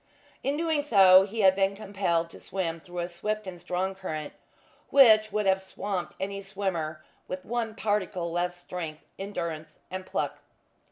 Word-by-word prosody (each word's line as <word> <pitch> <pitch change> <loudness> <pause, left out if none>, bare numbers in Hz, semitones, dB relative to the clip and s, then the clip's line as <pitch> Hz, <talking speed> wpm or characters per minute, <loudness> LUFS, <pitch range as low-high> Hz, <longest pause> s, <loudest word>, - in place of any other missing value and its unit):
In 280 +2 0
doing 320 -2 +1
so 195 -8 +7
he 220 +2 -2
had 190 -1 +6
been 195 0 +2
compelled 190 -5 -1
to - - -12
swim 175 -3 -3
through 175 +2 -11
a 170 - -2
swift 210 +5 -3
and 180 -2 -8
strong 185 +2 -1
current 155 -6 -5 0.6
which 220 -6 +7
would 210 0 0
have 190 0 +3
swamped 190 -1 -4
any 200 +1 -3
swimmer 185 -6 -3 0.2
with 185 0 -5
one 225 -1 -2
particle 190 -5 -1
less 175 +1 -1
strength, 170 -3 -6 0.2
endurance 165 -6 -5
and 185 0 -4
pluck. - - -2
190 Hz, 160 wpm, -28 LUFS, 175-205 Hz, 0.6 s, so